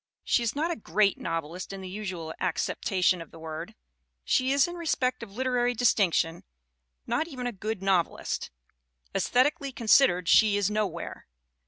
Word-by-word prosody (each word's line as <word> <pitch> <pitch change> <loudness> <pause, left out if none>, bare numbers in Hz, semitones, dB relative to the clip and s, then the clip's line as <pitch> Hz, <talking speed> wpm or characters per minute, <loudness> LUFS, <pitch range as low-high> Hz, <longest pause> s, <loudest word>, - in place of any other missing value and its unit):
She - - +2
is 235 +1 -1
not 320 +4 0
a - - -1
"great" 200 - +1
novelist 165 +3 -4
in 195 -1 -7
the 190 - -7
usual 185 -5 -5
acceptation 180 0 0
of 165 - -10
the - - -14
word; 160 -1 -7 0.5
she 260 - +2
is, 280 +2 +4
in 345 - -6
respect 315 -7 -1
of 230 -4 -8
literary 245 +1 0
distinction, 185 -8 +2 0.6
not 320 - 0
even 255 -6 -6
a 245 - -1
good 215 -1 -5
nov 190 -3 +3
elist. - - -5 0.6
Aesthetically 280 +3 +1
considered 225 -7 +4
she 210 +1 +5
is 205 0 +1
nowhere. 200 -6 -3
210 Hz, 160 wpm, -28 LUFS, 180-255 Hz, 0.6 s, she